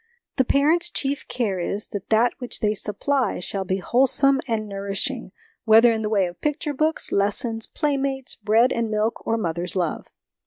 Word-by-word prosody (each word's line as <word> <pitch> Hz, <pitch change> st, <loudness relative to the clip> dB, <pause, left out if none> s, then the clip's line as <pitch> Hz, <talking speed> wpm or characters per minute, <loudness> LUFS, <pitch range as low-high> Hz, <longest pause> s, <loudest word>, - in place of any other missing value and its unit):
The 260 Hz, -, +3 dB
parents' 320 Hz, +7 st, +2 dB
chief 280 Hz, 0 st, -2 dB
care 210 Hz, -7 st, -1 dB
is, 200 Hz, +4 st, -3 dB
that 200 Hz, -2 st, -6 dB
that 225 Hz, +2 st, +3 dB
which 245 Hz, -2 st, -5 dB
they 210 Hz, -1 st, +2 dB
supply 225 Hz, +4 st, -1 dB
shall 190 Hz, +2 st, -4 dB
be 190 Hz, +1 st, 0 dB
wholesome 270 Hz, +6 st, +3 dB
and 220 Hz, -2 st, -1 dB
nourishing, 200 Hz, +4 st, -3 dB, 0.3 s
whether 225 Hz, +1 st, +6 dB
in 220 Hz, -1 st, -1 dB
the 210 Hz, -, -2 dB
way 200 Hz, -3 st, +2 dB
of 175 Hz, 0 st, -8 dB
picture 300 Hz, 0 st, -1 dB
books, 310 Hz, +3 st, -1 dB
lessons, 225 Hz, +3 st, 0 dB
playmates, 275 Hz, -3 st, -2 dB
bread 225 Hz, +4 st, +3 dB
and 230 Hz, -1 st, -1 dB
milk, 215 Hz, +1 st, -1 dB
or 225 Hz, -, +1 dB
mother's 175 Hz, -3 st, -3 dB
love. 175 Hz, -4 st, -2 dB
225 Hz, 170 wpm, -23 LUFS, 200-270 Hz, 0.3 s, whether